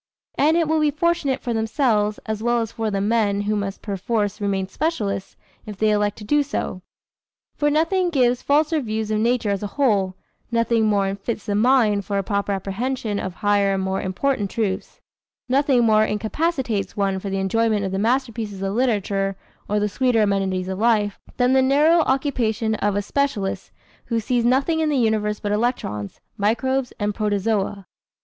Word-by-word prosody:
And 310 +3 +3
it 335 -2 +2
will 315 +1 +2
be 305 -1 +3
fortunate 300 -2 0
for 240 - -2
themselves, 220 -2 +1
as 220 -1 -3
well 240 +1 +2
as 225 -1 -4
for 225 -1 -2
the 200 -1 -1
men 205 -1 +1
who 210 +1 -1
must 200 -1 -4
perforce 205 +1 -2
remain 195 -2 -1
specialists, 205 - -2 0.3
if 210 -2 -7
they 215 +1 +2
elect 210 -1 +1
to 215 - -9
do 295 +8 +2
so. 265 -9 -3 0.7
For 295 - +1
nothing 330 +5 +2
gives 250 -6 +2
falser 305 +2 +2
views 220 -2 -3
of 215 - +1
nature 230 -2 +1
as 200 - -1
a 205 - -2
whole, 200 -9 +2 0.4
nothing 230 -1 +2
more 200 -2 +2
unfits 200 +3 -4
the 205 - -1
mind 215 -2 +3
for 200 +1 -2
a 195 - 0
proper 200 +1 -1
apprehension 205 +3 -2
of 185 -2 -5
higher 200 -1 +3
and 190 - -1
more 190 0 -1
important 200 +3 -1
truths, 200 -4 -3 0.5
nothing 265 -1 +3
more 215 -1 +4
incapacitates 220 - -1
one 195 -1 0
for 195 - -5
the 195 - -2
enjoyment 210 +1 +1
of 190 - -3
the 190 - -1
masterpieces 225 -4 -1
of 195 0 -1
literature 200 -5 0 0.3
or 210 +1 +1
the 210 - +1
sweeter 235 +1 +2
amenities 195 -2 0
of 190 0 -4
life, 215 -3 +2 0.2
than 250 0 +3
the 265 - +5
narrow 295 +6 +4
occupation 240 -5 0
of 205 -2 0
a 205 - 0
specialist 220 -6 -1 0.4
who 230 -1 -1
sees 240 +2 0
nothing 270 +6 +2
in 315 -1 +1
the 290 - +1
universe 215 -3 +1
but 205 - -3
electrons, 210 - -2 0.2
microbes 255 +5 0
and 205 0 0
protozoa. 205 -1 -1
215 Hz, 180 wpm, -22 LUFS, 200-255 Hz, 0.7 s, the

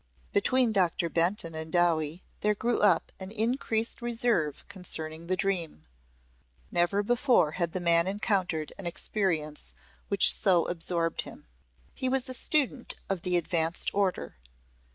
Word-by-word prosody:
Between 260 - +3
Doctor 180 -3 +1
Benton 170 0 0
and 160 0 -5
Dowie 170 -1 +1 0.2
there 210 0 +1
grew 235 +3 0
up 205 - +3
an 190 0 -7
increased 225 +1 -1
reserve 230 - -1
concerning 165 -4 -3
the 185 - +1
dream. 175 - -2 0.9
Never 175 +4 +2
before 245 - +3
had 170 0 -2
the 185 - -2
man 170 0 +3
encountered 190 -6 -1
an 190 - -4
experience 165 -4 -2 0.3
which 200 - +5
so 180 -4 +3
absorbed 165 -1 -2
him. - - -12 0.5
He 260 - -2
was 265 0 0
a 255 - -5
student 270 -2 0
of 195 -3 -1
the 180 +1 +2
advanced 165 0 -1
order. 195 - -1
185 Hz, 135 wpm, -29 LUFS, 165-215 Hz, 0.9 s, which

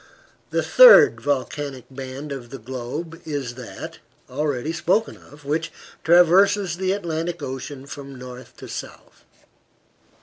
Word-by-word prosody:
The - - 0
third - - +8
volcanic 140 0 -3
band 135 +2 -7
of 130 -4 -7
the 135 - -8
globe 130 +8 -7
is 140 -6 -4
that, 120 -6 -9 0.3
already 145 +1 -2
spoken 180 +7 0
of, 145 0 -17
which 160 +3 -2 0.3
traverses 180 +2 +4
the 190 0 0
Atlantic 170 -3 -3
Ocean 135 +1 -6
from 140 -1 -9
north 125 -1 -11
to - - -10
south. - - -10
145 Hz, 125 wpm, -22 LUFS, 130-165 Hz, 0.3 s, third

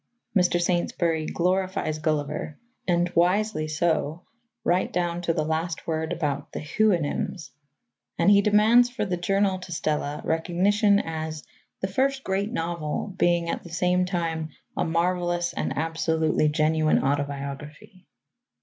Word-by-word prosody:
Mr. 180 -2 +3
Saintsbury 170 -2 0
glorifies 185 -3 0
Gulliver, 155 -1 -2 0.3
and 175 0 +2
wisely 180 -1 +2
so, 160 +1 0 0.4
right 180 +2 +1
down 175 -1 -1
to 170 - 0
the 155 -2 -1
last 160 +1 -2
word 160 0 -2
about 145 -4 -2
the - - -3
Houyhnhnms, 175 -1 0 0.7
and 200 - +4
he 200 0 +6
demands 215 +4 +5
for 245 -3 -3
the 185 -3 -1
Journal 195 +2 +1
to 185 -1 -10
Stella 150 -3 -2
recognition 190 +5 +2
as 160 -3 -4 0.4
"the 190 - 0
first 265 +7 0
great 195 +3 -1
novel, 170 0 -3
being 175 -2 +2
at - - -2
the 175 - -12
same 180 +2 +1
time 165 -3 -2 0.3
a - - 0
marvellous 175 +1 0
and - - -3
absolutely 160 -1 +1
genuine 155 +1 +2
autobiography." 145 +5 -4
170 Hz, 130 wpm, -25 LUFS, 155-185 Hz, 0.7 s, he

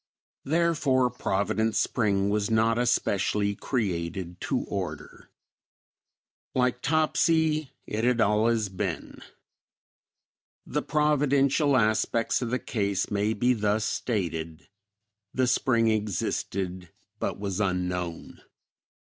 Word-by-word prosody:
Therefore 145 -5 +2
Providence 110 0 0
Spring 100 -4 +1
was 105 0 0
not 115 +1 +2
especially 100 -4 +1
created 90 - -3
to - - -1
order. - - -6 1.3
Like 125 -1 +1
Topsy, 155 0 +2 0.2
it 110 +1 -3
had 125 0 +2
"allus" 110 0 +2
been. 95 -3 -5 1.4
The - - -2
providential 145 -1 +2
aspects 110 +1 +1
of 120 - -2
the 125 - +1
case 100 -6 -2
may 105 +2 +1
be 120 +4 +2
thus 105 -1 0
stated; 85 -8 -3 0.7
the 130 - +3
spring 120 -2 +2
existed, 95 -3 -2 0.3
but - - -3
was 100 -1 -3
unknown. 90 -3 -2
110 Hz, 100 wpm, -27 LUFS, 100-125 Hz, 1.4 s, the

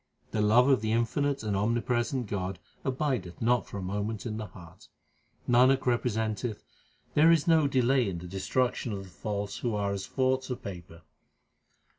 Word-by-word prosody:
The 110 - 0
love 115 +5 +5
of 135 -6 +4
the 110 0 0
infinite 135 +4 0
and 105 -2 -1
omnipresent 120 +4 0
God 95 -2 -3 0.3
abideth 130 - -2
not 120 +1 +2
for - - -7
a 95 - -4
moment 105 +4 -3
in 110 -2 -3
the 110 -1 -5
heart. 85 -2 -14 0.6
Nanak 130 +2 +4
representeth 110 -2 -1 0.5
there 155 +2 +6
is 165 -2 +4
no 160 -3 +5
delay 130 -3 +2
in 90 - -4
the 85 - -8
destruction 115 +5 -1
of 100 -1 -5
the 95 - -13
false 105 +2 -4
who 120 -3 -1
are 100 -1 0
as 100 -1 -4
forts 130 0 0
of 125 - -5
paper. 85 -3 -9
115 Hz, 170 wpm, -29 LUFS, 100-130 Hz, 0.6 s, there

